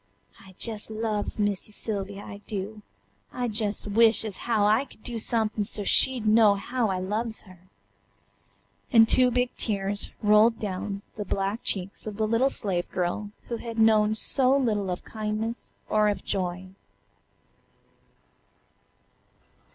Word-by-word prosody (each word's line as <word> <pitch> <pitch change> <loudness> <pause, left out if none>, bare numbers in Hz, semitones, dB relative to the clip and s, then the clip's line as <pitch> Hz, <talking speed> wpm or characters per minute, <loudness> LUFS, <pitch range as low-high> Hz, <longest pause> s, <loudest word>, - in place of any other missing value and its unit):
"I 190 -1 -16
jes' 220 -2 -3
loves 215 -1 -2
Missy 205 0 -1
Sylvia, 200 -2 -4
I 200 - -8
do, 210 +1 -5 0.5
I 250 - -3
jes' 215 -2 -1
wish 225 +2 +4
ez 210 -3 -1
how 220 -4 +1
I 220 +6 +3
could 215 - -18
do 240 -2 -3
somethin' 220 -2 0
so 205 0 -2
she'd 250 +3 +3
know 215 -1 +5
how 240 +2 -1
I 190 - -1
loves 215 +5 -3
her," 185 -2 -18 1.2
and 225 -3 +7
two 255 +1 +4
big 245 0 0
tears 200 -2 -1
rolled 215 +2 +5
down 200 0 -4
the 210 - -2
black 195 +3 -2
cheeks 195 +2 -3
of 210 -1 -5
the 220 -1 +1
little 230 +5 +3
slave 185 -9 -2
girl 185 +3 -2 0.2
who 235 - -3
had 230 0 -7
known 215 -1 +4
so 265 +4 +3
little 210 -7 0
of 180 - -4
kindness 220 +1 -4 0.2
or 215 0 +3
of 205 - -3
joy. 185 -1 -3
215 Hz, 145 wpm, -26 LUFS, 200-225 Hz, 1.2 s, and